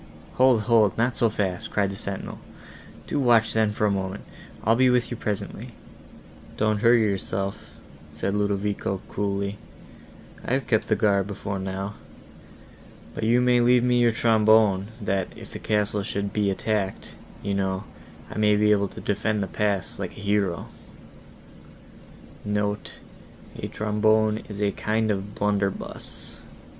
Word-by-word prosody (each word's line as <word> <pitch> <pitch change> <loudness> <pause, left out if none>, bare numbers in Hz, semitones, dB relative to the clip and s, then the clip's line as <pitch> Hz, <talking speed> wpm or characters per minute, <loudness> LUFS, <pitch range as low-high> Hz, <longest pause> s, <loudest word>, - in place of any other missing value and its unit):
"Hold, 130 -3 +4
hold, 110 -3 +3
not 120 +2 +1
so 115 - +2
fast," 95 -4 -2
cried 100 -2 0
the - - -6
sentinel, 100 0 -5 0.7
"do 145 - -2
watch 120 -4 +4
then, 110 -1 +2
for 105 0 0
a 105 - +3
moment: 95 0 -3 0.4
I'll 115 +2 +4
be 130 +1 +4
with 125 -1 +2
you - - -2
presently." 105 -3 -4 0.8
"Don't 110 -1 +1
hurry 115 0 +5
yourself," 100 -1 -2 0.5
said 75 +6 -2
Ludovico, 100 -1 -1
coolly, 100 0 -2 0.8
"I - - -2
have 135 -2 0
kept 110 -1 +1
guard 100 -3 +2
before 100 -1 -4
now. 95 +1 -4 1.2
But 110 - -3
you 120 +2 +4
may 125 0 +4
leave 120 0 +4
me 125 0 +3
your 120 -1 +4
trombone,* 110 -3 +4
that, 95 -2 0
if - - -11
the - - -6
castle 105 -1 0
should 100 0 -3
be 105 -2 +1
attacked, 100 0 -2 0.3
you 100 - -1
know, 95 -1 -1 0.5
I - - -4
may 105 -1 +4
be 105 0 +3
able 100 -1 +3
to - - -10
defend 105 0 0
the - - -3
pass, 100 -3 -1
like 95 -3 -5
a - - -9
hero." 100 -4 0 1.8
(*Note: 105 -1 -2 0.6
A - - -5 1.0
kind 110 +2 0
of 100 0 -4
blunderbuss. 100 -1 -3
105 Hz, 140 wpm, -25 LUFS, 100-110 Hz, 1.8 s, hurry